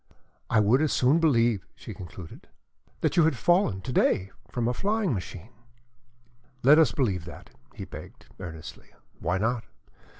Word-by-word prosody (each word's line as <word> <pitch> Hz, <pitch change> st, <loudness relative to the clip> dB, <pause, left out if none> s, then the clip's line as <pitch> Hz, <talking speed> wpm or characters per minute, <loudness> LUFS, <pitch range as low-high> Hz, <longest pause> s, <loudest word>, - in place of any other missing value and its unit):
I 115 Hz, -, +3 dB
would 110 Hz, +7 st, +4 dB
as 155 Hz, -, +1 dB
soon 135 Hz, +6 st, +3 dB
believe," 120 Hz, -, +2 dB
she -, -, -9 dB
concluded, 90 Hz, -1 st, -11 dB, 0.5 s
"that -, -, 0 dB
you 165 Hz, -, +6 dB
had 160 Hz, -5 st, +1 dB
fallen, 170 Hz, -, +2 dB
to 130 Hz, -, -5 dB
day 95 Hz, -4 st, +2 dB, 0.2 s
from 120 Hz, +1 st, -2 dB
a 125 Hz, -, +1 dB
flying 205 Hz, -, 0 dB
machine." 95 Hz, +1 st, -7 dB, 1.1 s
"Let 145 Hz, +5 st, +7 dB
us 155 Hz, -8 st, +5 dB
believe 100 Hz, -, -1 dB
that," 85 Hz, -, -11 dB, 0.2 s
he -, -, -7 dB
begged, -, -, -11 dB
earnestly. 80 Hz, -4 st, -9 dB, 0.3 s
"Why 90 Hz, +3 st, 0 dB
not? 115 Hz, +4 st, -1 dB
120 Hz, 155 wpm, -27 LUFS, 95-150 Hz, 1.1 s, Let